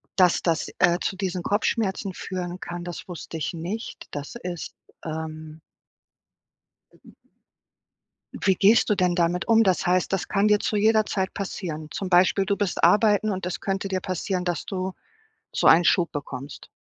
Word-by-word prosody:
dass 180 -3 +4
das, 165 -2 0
äh, 175 0 +4
zu 190 - -1
diesen 185 -2 -3
Kopfschmerzen 200 -2 0
führen 180 -1 -5
kann, 175 0 -6
das 175 +1 -7
wusste 170 -2 -7
ich 160 - -3
nicht. 180 +8 -6
Das 145 +9 -6
ist, 175 -2 -5 0.3
ähm 155 0 -6 2.9
Wie 190 -1 +4
gehst 210 +5 +4
du 210 - +3
denn 180 -2 +2
damit 175 0 0
um? 225 0 +5
Das 185 -3 +1
heißt, 180 +2 +1
das 190 - -1
kann 205 +1 +2
dir 210 -1 +4
zu 210 - -1
jeder 215 +1 +4
Zeit 190 -1 -2
passieren? 160 -6 -5
Zum 195 - -4
Beispiel, 185 +2 +4
du 200 - +1
bist 200 -3 -2
arbeiten 210 +3 +4
und 190 -2 -3
das 180 - -3
könnte 195 0 -2
dir 190 -1 -1
passieren, 185 0 -3
dass 175 -3 -2
du 185 -1 -3 0.6
so - - -1
einen 170 +2 +7
Schub 175 -3 +3
bekommst? 140 -1 -7
185 Hz, 165 wpm, -25 LUFS, 175-200 Hz, 2.9 s, einen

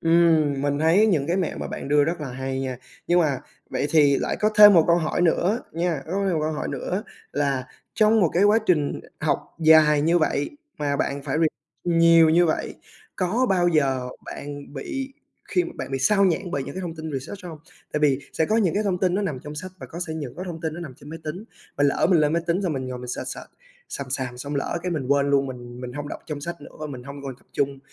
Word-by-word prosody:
Ừm, 165 -4 +3
mình 145 0 0
thấy 170 +8 +4
những 155 -9 +2
cái 175 - 0
mẹo 185 -5 -1
mà - - -4
bạn - - -6
đưa 145 0 +4
rất 170 +1 -2
là 145 - -4
hay 130 +1 -3
nha. 130 -2 -4 0.3
Nhưng 175 +1 +4
mà 145 -6 +1 0.3
vậy 130 +2 -1
thì 145 -3 +5
lại - - -1
có 215 - +3
thêm 210 -1 +10
một 165 - +6
câu 170 0 +5
hỏi 160 0 -1
nữa 180 +7 +2
nha, 165 -4 -1
có 170 - -6
thêm 190 - +1
một 155 - 0
câu 155 +1 0
hỏi 150 - -3
nữa 190 +4 -3 0.3
là 140 -3 0 0.3
trong 220 0 +4
một 170 - +4
cái 185 +4 +3
quá 210 +2 +5
trình 150 -5 +1 0.2
học - - +1 0.2
dài 155 -2 +6
như 170 +2 +3
vậy 150 -3 0 0.3
mà 145 -1 0
bạn 140 0 -2
phải 140 0 -2
re 165 - +5 0.4
nhiều 165 -1 +6
như 175 +2 +5
vậy, 155 - -1 0.4
có 215 +8 +1
bao 180 -2 +3
giờ 135 -6 +1 0.2
bạn 145 0 -8
bị 265 - -5 0.4
khi 360 - +2
mà 345 - -6
bạn - - -6
bị 135 - 0
xao 200 +7 +3
nhãng 180 0 0
bởi 140 -5 -2
những - - -8
cái 190 - -4
thông 170 -2 -5
tin 160 -1 -6
research 180 +9 -6
hông? 160 -3 -8 0.3
Tại 150 - -1
vì 140 -3 +3
sẽ 160 - +1
có 220 - +2
những 195 -7 +2
cái 205 - +1
thông 190 -4 0
tin 180 -1 +1
nó 205 - 0
nằm 150 -9 -2
trong 150 0 -8
sách 185 +4 -6
và - - -8
có 170 - -8
sẽ 160 - -4
những 145 -6 -5
có 185 - -5
thông 170 -3 -6
tin 160 -2 -3
nó 175 - -7
nằm 145 -7 -7
trên 145 - -14
máy 165 - -7
tính, 175 +8 -5 0.3
mà 145 - +2
lỡ 140 - +3
mình 170 -4 +5
lên 150 0 +2
máy 170 0 +1
tính 175 +4 +1
xong 175 -4 0
mình 130 -2 -3
ngồi 125 -1 -5
mình 125 0 -8
search, - - -4
search - - -6 0.5
xàm 140 -2 -6
xàm 130 -2 -3
xong 145 +3 -5
lỡ 140 +4 -2
cái 180 - -2
mình 145 -6 -2
quên 140 0 +3
luôn, 140 -1 +3
mình 120 -1 -8
mình 125 -1 -6
hông 145 +2 -5
đọc - - -6
trong 150 -3 -5
sách 170 0 -6
nữa - - -11
và 155 - -3
mình 130 -4 -7
hông 140 +2 -9
còn 135 -3 -6
tập - - -28
trung 140 -1 -1
155 Hz, 265 wpm, -24 LUFS, 140-175 Hz, 0.5 s, thêm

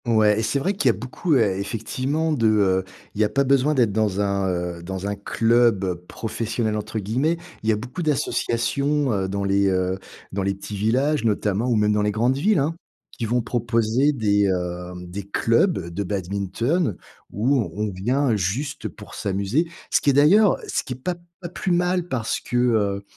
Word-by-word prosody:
Ouais 110 -2 +4
et - - +1
c'est 110 +5 0
vrai 185 +9 0
qu'il 145 -10 +2
y - - +4
a - - -12
beaucoup, 130 +7 -1
eh, 100 -6 +2
effectivement, 130 +9 -2
de, 115 -6 +2
heu, 95 -3 +3 0.3
il 105 - -2
y - - +6
a 105 - +2
pas 140 - +2
besoin 140 +2 +3
d'être 120 -6 +3
dans 105 -2 0
un, 100 -1 0 0.3
heu, - - -11
dans 95 +2 -5
un 100 0 -1
club 115 -2 +2
«professionnel», 110 0 -2
entre 105 +1 -5
guillemets. 125 - 0 0.2
Il 110 - -1
y - - +6
a - - +2
beaucoup 125 - -6
d'associations, 140 -1 0
heu, 95 -2 0
dans 100 +1 -2
les, 100 0 +2
heu, 95 0 0 0.3
dans 100 - -2
les 100 +1 0
petits 100 +1 -7
villages, 130 +9 +1
notamment, 105 0 0
ou 120 - +2
même 105 0 +3
dans 105 - +1
les 105 - +1
grandes 115 +5 +1
villes, 200 +10 +2
hein, 150 +3 +1 0.4
qui 115 - -4
vont 120 +2 0
proposer 120 +3 +1
des, 105 -6 +2
heu, 90 -1 -3
des 90 +3 -6
clubs 115 - +2 0.2
de 100 - -2
badminton 100 - -1 0.3
où 120 +3 +1
on 105 0 -2
vient 120 +7 +1
juste 105 - -2
pour - - -12
s'amuser. 100 - 0 0.2
Ce - - +3
qui - - +2
est - - +4
d'ailleurs 175 +9 +5
ce - - -1
qui 130 - -5
est - - -8
pas 180 - -1 0.3
pas 175 - -6
plus 180 +1 -3
mal 180 0 +1
parce 120 -7 -2
que, 125 - -3
heu, 105 -5 +1
110 Hz, 200 wpm, -23 LUFS, 100-135 Hz, 0.4 s, y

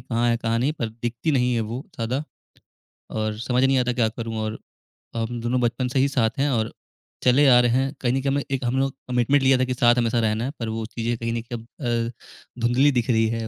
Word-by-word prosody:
कहाँ 120 0 +1
है 115 - +3
कहाँ 115 0 -1
नहीं, 135 +5 +1
पर 120 -7 -3
दिखती 120 +6 -3
नहीं 125 -2 +2
है 115 - +1
वो 125 +3 -4
ज़्यादा 125 +4 -1 0.9
और 110 -1 -2
समझ 125 +2 +1
नहीं 135 0 +4
आता 125 0 +1
क्या 115 -2 +2
करूँ 115 0 -5
और 110 0 -3 0.6
हम 115 +1 -2
दोनों 125 +2 0
बचपन 120 +2 0
से 135 - +2
ही 135 - +4
साथ 125 -3 0
हैं 145 +1 +2
और 115 -3 -1 0.5
चले 135 +3 +5
आ 125 -2 +7
रहे 120 - +2
हैं, 135 +2 -3
कहीं 125 -1 +1
न 135 - 0
कहीं 135 0 0
अम 145 - +1
एक 135 -1 -1
हम 120 +2 0
लोग 135 0 0 0.2
कमिटमेंट 125 +3 +2
लिया 130 0 +5
था 130 - +2
कि 130 - -2
साथ 120 -1 +4
हमेशा 120 0 +1
रहना 110 0 0
है 135 - -2
पर 115 -2 -3
वो 110 0 -3
चीज़ें 115 +1 -3
कहीं 115 0 -3
न 115 - -2
कहीं 120 - -3
अब 115 - -15 0.4
अ, 120 +1 -17
धुंधली 125 +5 +4
दिख 120 -2 -1
रही 115 -2 +3
है 115 0 -3
120 Hz, 250 wpm, -24 LUFS, 115-130 Hz, 0.9 s, आ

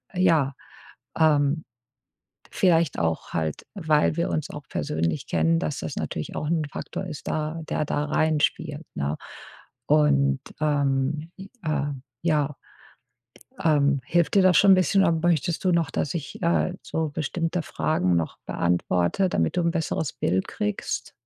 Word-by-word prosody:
ja, 160 -7 +3 0.7
ähm 150 -1 +3 0.9
vielleicht 165 -5 +2
auch 80 -1 -1
halt, 80 -2 -2
weil 155 -4 +2
wir 170 - 0
uns 155 - -2
auch 145 -1 -8
persönlich 80 +1 -2
kennen, 80 0 +2
dass 75 - -2
das - - -5
natürlich - - -4
auch 150 - -2
'n 165 -2 +1
Faktor 190 - -5
ist, 155 -4 -7
da 155 +1 -2
der 155 - 0
da 145 0 -1
reinspielt, 155 0 0
ne? 70 +2 -1 0.7
Und, 140 -2 +3 0.2
ähm, 145 +1 0
äh, 190 - -9 0.7
ja, 150 -4 +1 1.1
ähm 145 -3 +3
hilft 170 +1 +2
dir 195 - +7
das 185 -3 +5
schon 200 -1 +7
'n - - +9
bisschen, 190 +2 +3
oder 170 - +4
möchtest 165 -1 +1
du 180 - +4
noch, 170 -1 +1
dass 145 - -2
ich, 155 +1 -6
äh, 170 +1 +2
so 160 -1 -2
bestimmte 165 +4 -2
Fragen 90 - 0
noch 85 -1 -2
beantworte, 90 - +1
damit 80 - 0
du - - +3
'n 170 - +1
besseres 160 -4 -1
Bild 95 +1 0
kriegst? 105 0 -3
150 Hz, 145 wpm, -25 LUFS, 135-165 Hz, 1.1 s, n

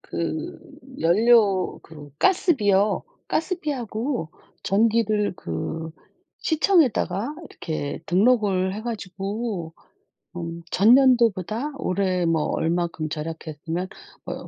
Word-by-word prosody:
그 160 -2 -4 0.4
연료 200 +1 +4
그 150 -3 -12
가스비요. 210 - +3 0.3
가스비하고 265 - -2 0.3
전기를 215 0 +2
그 160 - -4 0.5
시청에다가 305 - +2
이렇게 155 -3 -5
등록을 195 -1 +2
해 215 - -6
가지고 200 -4 -4 0.6
음 170 -1 -5
전년도보다 235 - +4
올해 185 -5 0
뭐 165 -2 +2
얼만큼 165 -1 -1
절약했으면 160 +2 -5 0.4
뭐 - - -6
195 Hz, 205 characters per minute, -24 LUFS, 170-235 Hz, 0.6 s, 연료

